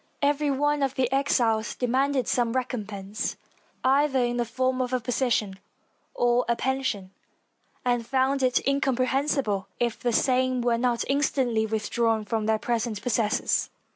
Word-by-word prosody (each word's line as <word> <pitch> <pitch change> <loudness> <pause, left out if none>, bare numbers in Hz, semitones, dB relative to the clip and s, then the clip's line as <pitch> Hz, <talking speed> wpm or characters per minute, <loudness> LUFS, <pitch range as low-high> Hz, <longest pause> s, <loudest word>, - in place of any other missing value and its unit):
Every 290 +1 +2
one 290 +1 +1
of 270 -1 0
the 255 -2 0
exiles 235 -5 +1
demanded 260 +2 0
some 235 -2 +1
recompense, 215 -5 -3 0.5
either 275 +1 +3
in 240 -1 +1
the 240 - 0
form 255 +2 -1
of 255 0 -2
a 255 - +2
position 230 -5 -1 0.6
or 245 0 +2
a 235 - +3
pension, 255 -8 -2 0.7
and 245 -1 +1
found 265 +3 +1
it 255 -1 +2
incomprehensible 265 -5 0
if 240 -2 -1
the 240 - 0
same 255 +1 +2
were 235 -1 +1
not 240 -1 +1
instantly 260 -5 +1
withdrawn 220 0 0
from 220 0 -2
their 220 0 +3
present 230 -1 -2
possessors. 225 -3 +1
245 Hz, 140 wpm, -26 LUFS, 225-265 Hz, 0.7 s, either